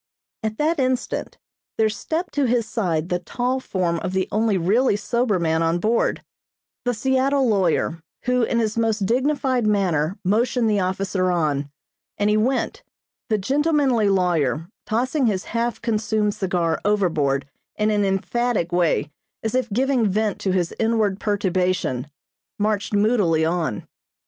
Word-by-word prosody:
At 220 Hz, 0 st, -3 dB
that 310 Hz, +1 st, +1 dB
instant 255 Hz, -1 st, -1 dB, 0.4 s
there 220 Hz, -, +3 dB
stepped 320 Hz, +11 st, -3 dB
to 285 Hz, -2 st, +1 dB
his 235 Hz, -2 st, +1 dB
side 180 Hz, -8 st, -1 dB
the 180 Hz, -, 0 dB
tall 250 Hz, +8 st, -2 dB
form 180 Hz, -8 st, -1 dB
of 185 Hz, -, -4 dB
the 190 Hz, -1 st, 0 dB
only 215 Hz, -1 st, +2 dB
really 205 Hz, +7 st, +2 dB
sober 220 Hz, 0 st, 0 dB
man 160 Hz, -1 st, +1 dB
on 165 Hz, +1 st, +2 dB
board 220 Hz, +6 st, 0 dB, 0.6 s
the 245 Hz, -, +1 dB
Seattle 265 Hz, +3 st, +2 dB
lawyer, 180 Hz, -5 st, +1 dB, 0.2 s
who, 250 Hz, 0 st, +1 dB
in 235 Hz, +1 st, +1 dB
his 225 Hz, -1 st, 0 dB
most 220 Hz, -3 st, +1 dB
dignified 260 Hz, 0 st, +1 dB
manner 185 Hz, -5 st, +1 dB
motioned 230 Hz, +4 st, +2 dB
the 210 Hz, -2 st, +2 dB
officer 185 Hz, 0 st, 0 dB
on, 145 Hz, -5 st, 0 dB, 0.5 s
and 205 Hz, +1 st, +2 dB
he -, -, +3 dB
went; 250 Hz, +5 st, 0 dB, 0.5 s
the 215 Hz, -, +2 dB
gentlemanly 270 Hz, -1 st, +2 dB
lawyer, 165 Hz, -6 st, +1 dB, 0.2 s
tossing 255 Hz, +4 st, +1 dB
his 195 Hz, -4 st, 0 dB
half 235 Hz, +1 st, -2 dB
consumed 215 Hz, -2 st, 0 dB
cigar 175 Hz, -5 st, -1 dB
overboard 160 Hz, -10 st, +1 dB, 0.3 s
in 215 Hz, 0 st, +1 dB
an 205 Hz, -1 st, +2 dB
emphatic 195 Hz, 0 st, 0 dB
way 175 Hz, -3 st, +1 dB, 0.3 s
as 220 Hz, -, -2 dB
if 255 Hz, -1 st, 0 dB
giving 250 Hz, 0 st, +1 dB
vent 210 Hz, +1 st, 0 dB
to 190 Hz, -, -1 dB
his 180 Hz, -2 st, 0 dB
inward 220 Hz, -3 st, +1 dB
perturbation, 185 Hz, -, 0 dB, 0.5 s
marched 210 Hz, -1 st, 0 dB
moodily 205 Hz, -7 st, +3 dB
on. 165 Hz, -, -1 dB
210 Hz, 145 wpm, -22 LUFS, 180-240 Hz, 0.6 s, there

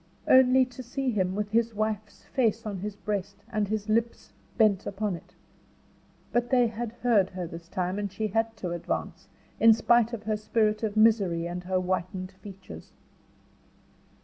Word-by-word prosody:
Only 260 Hz, 0 st, +6 dB
to 250 Hz, 0 st, -10 dB
see 255 Hz, +2 st, -2 dB
him 185 Hz, -3 st, 0 dB
with 210 Hz, 0 st, -3 dB
his 230 Hz, 0 st, +1 dB
wife's 215 Hz, 0 st, -3 dB
face 230 Hz, -3 st, 0 dB
on 205 Hz, -2 st, -3 dB
his 205 Hz, +2 st, -5 dB
breast, 200 Hz, -1 st, -4 dB
and 210 Hz, -1 st, 0 dB
his 215 Hz, 0 st, -2 dB
lips 230 Hz, +2 st, -1 dB, 0.2 s
bent 210 Hz, -4 st, +3 dB
upon 200 Hz, -1 st, -2 dB
it. 170 Hz, -, -14 dB, 1.0 s
But 240 Hz, 0 st, 0 dB
they 250 Hz, -2 st, +4 dB
had 225 Hz, +1 st, -5 dB
heard 210 Hz, -6 st, +4 dB
her 185 Hz, -2 st, -5 dB
this 165 Hz, 0 st, -9 dB
time, 185 Hz, +2 st, -2 dB
and 205 Hz, -2 st, -3 dB
she 215 Hz, +2 st, -2 dB
had 225 Hz, +2 st, -1 dB
to 180 Hz, -4 st, -4 dB
advance, 170 Hz, -1 st, -4 dB, 0.3 s
in 225 Hz, 0 st, +8 dB
spite 235 Hz, 0 st, +3 dB
of 230 Hz, -3 st, -5 dB
her 215 Hz, 0 st, -1 dB
spirit 215 Hz, 0 st, +1 dB
of 215 Hz, -1 st, -2 dB
misery 200 Hz, -7 st, +3 dB
and 175 Hz, +1 st, -5 dB
her 185 Hz, 0 st, 0 dB
whitened 185 Hz, 0 st, -2 dB
features. 190 Hz, 0 st, -12 dB
210 Hz, 170 wpm, -27 LUFS, 190-225 Hz, 1.0 s, in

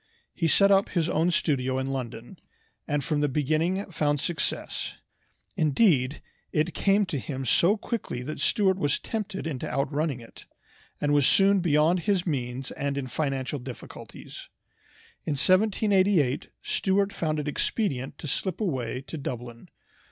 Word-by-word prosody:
He 165 Hz, -, 0 dB
set 200 Hz, +5 st, +5 dB
up 195 Hz, 0 st, +4 dB
his 170 Hz, -3 st, 0 dB
own 165 Hz, +3 st, +2 dB
studio 130 Hz, -6 st, +1 dB
in 130 Hz, +1 st, -2 dB
London, 125 Hz, -, -6 dB, 0.5 s
and 145 Hz, -2 st, 0 dB
from 150 Hz, +1 st, 0 dB
the 145 Hz, 0 st, +2 dB
beginning 155 Hz, +8 st, 0 dB
found 145 Hz, -3 st, +1 dB
success. 155 Hz, 0 st, -2 dB, 0.6 s
Indeed, 150 Hz, -, +2 dB, 0.3 s
it 155 Hz, +3 st, 0 dB
came 200 Hz, +1 st, +3 dB
to 155 Hz, -6 st, -3 dB
him 135 Hz, -1 st, -5 dB
so 175 Hz, -, +4 dB
quickly 205 Hz, -, -4 dB
that 155 Hz, +3 st, -5 dB
Stuart 190 Hz, +5 st, +2 dB
was 145 Hz, -5 st, +1 dB
tempted 210 Hz, -5 st, -4 dB
into 145 Hz, -6 st, -3 dB
outrunning 140 Hz, 0 st, -1 dB
it, 115 Hz, -, -14 dB, 0.5 s
and 145 Hz, 0 st, +1 dB
was 145 Hz, -3 st, +4 dB
soon 195 Hz, 0 st, +5 dB
beyond 165 Hz, +1 st, +3 dB
his 190 Hz, 0 st, 0 dB
means 130 Hz, -4 st, -3 dB
and 140 Hz, 0 st, -3 dB
in 140 Hz, -, -2 dB
financial 135 Hz, +1 st, -2 dB
difficulties. 125 Hz, 0 st, -10 dB, 0.7 s
In 155 Hz, -, -1 dB
1788 185 Hz, -, +3 dB
Stuart 195 Hz, +1 st, +1 dB
found 155 Hz, -2 st, -1 dB
it 150 Hz, -1 st, -3 dB
expedient 140 Hz, -, -1 dB
to -, -, -7 dB
slip 185 Hz, +4 st, -2 dB
away 130 Hz, -, -2 dB
to 155 Hz, +3 st, -7 dB
Dublin. 120 Hz, -3 st, -6 dB
150 Hz, 145 wpm, -27 LUFS, 135-185 Hz, 0.7 s, set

